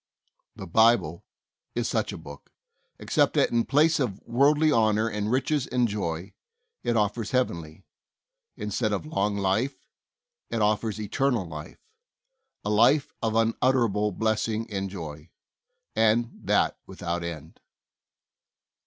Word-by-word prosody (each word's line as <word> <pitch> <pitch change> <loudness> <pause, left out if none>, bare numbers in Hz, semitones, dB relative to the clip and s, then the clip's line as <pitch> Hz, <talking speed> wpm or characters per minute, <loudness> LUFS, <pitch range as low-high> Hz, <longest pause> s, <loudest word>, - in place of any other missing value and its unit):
The 95 - -8
Bible 105 -4 +3 0.5
is - - 0
such - - -1
a - - -6
book, 70 0 -12 0.5
except - - +1
that - - +3
in 120 -1 +2
place 155 +4 +3
of 110 -8 -1
worldly 145 +6 +3
honor 110 -3 +3
and 105 -1 -2
riches 130 +3 0
and 125 -1 +1
joy, 95 -4 -4 0.5
it 120 - +1
offers 105 +1 0
heavenly; 85 -9 -2 0.7
instead 105 +1 -1
of 100 - -2
long 105 -9 -1
life, 100 +5 0 0.7
it 115 - -2
offers 105 0 0
eternal 115 +1 0
life 75 -2 -10 0.4
— - - -54
a 105 - 0
life 140 +7 +4
of 110 -1 0
unutterable 115 -2 +2
blessing 110 0 -1
and 95 -1 -2
joy, 80 -4 -8 0.7
and 115 +2 +3
that - - +2
without 85 0 -4
end. 80 -2 -7
110 Hz, 125 wpm, -26 LUFS, 95-120 Hz, 0.7 s, life